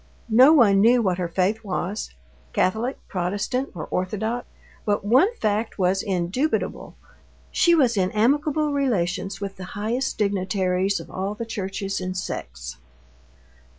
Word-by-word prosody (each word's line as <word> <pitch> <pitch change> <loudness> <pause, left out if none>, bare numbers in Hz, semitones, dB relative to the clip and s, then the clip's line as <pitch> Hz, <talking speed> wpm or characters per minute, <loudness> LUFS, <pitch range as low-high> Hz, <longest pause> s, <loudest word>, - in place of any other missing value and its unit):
No 255 +6 +8
one 210 -10 +5
knew 240 +3 +5
what 185 -2 0
her 180 - -1
faith 190 +6 0
was—Catholic, 180 - -3
Protestant, 200 +8 -2
or 165 - -5
Orthodox. 220 +6 -2 0.4
But 205 -1 0
one 260 - +5
fact 215 - -1
was 190 0 +2
indubitable—she 225 - -1
was 255 -7 +3
in 185 -2 +1
amicable 290 - +1
relations 195 -9 -1
with 195 -1 -5
the 185 - -7
highest 235 +6 -1
dignitaries 190 -1 0
of - - -11
all 195 +2 -3
the 230 - -5
churches 195 -2 -3
and 185 0 -4
sects. - - -6
200 Hz, 125 wpm, -24 LUFS, 185-235 Hz, 0.4 s, No